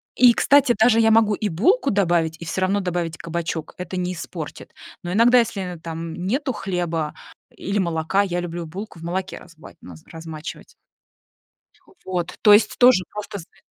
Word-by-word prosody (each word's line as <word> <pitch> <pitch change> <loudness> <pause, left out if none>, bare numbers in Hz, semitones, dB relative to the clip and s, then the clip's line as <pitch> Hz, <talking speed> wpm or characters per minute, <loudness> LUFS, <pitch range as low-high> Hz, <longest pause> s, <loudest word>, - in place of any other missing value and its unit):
и, 245 -1 +6
кстати, 280 -1 +4
даже 225 +1 +4
я 225 -1 +4
могу 220 -1 +4
и 215 - -2
булку 275 - +2
добавить, 175 -6 +1
и 170 - -8
всё 190 - -3
равно 190 +2 +1
добавить 175 -3 -3
кабачок, 165 -1 -4
это 180 +1 -6
не 180 0 -2
испортит. 160 -2 -8 0.3
Но 175 - -4
иногда, 240 +4 +5
если 190 -7 -3
там 165 0 -6
нету 260 +7 -1
хлеба 170 -6 -3 0.4
или 200 +2 -2
молока, 170 +1 0
я 180 -3 -1
люблю 175 -1 -5
булку 190 +2 -8
в - - -12
молоке 185 +3 -4
разва 165 -2 -15
ма 90 - -11 0.2
размачивать. 160 -1 -9 1.1
Х - - -36 0.2
вот, 175 -2 -4
то 210 - +7
есть 210 +2 +4
тоже 245 -7 +6
просто 210 -1 -6
знать 170 - -15
180 Hz, 170 wpm, -22 LUFS, 165-210 Hz, 1.1 s, то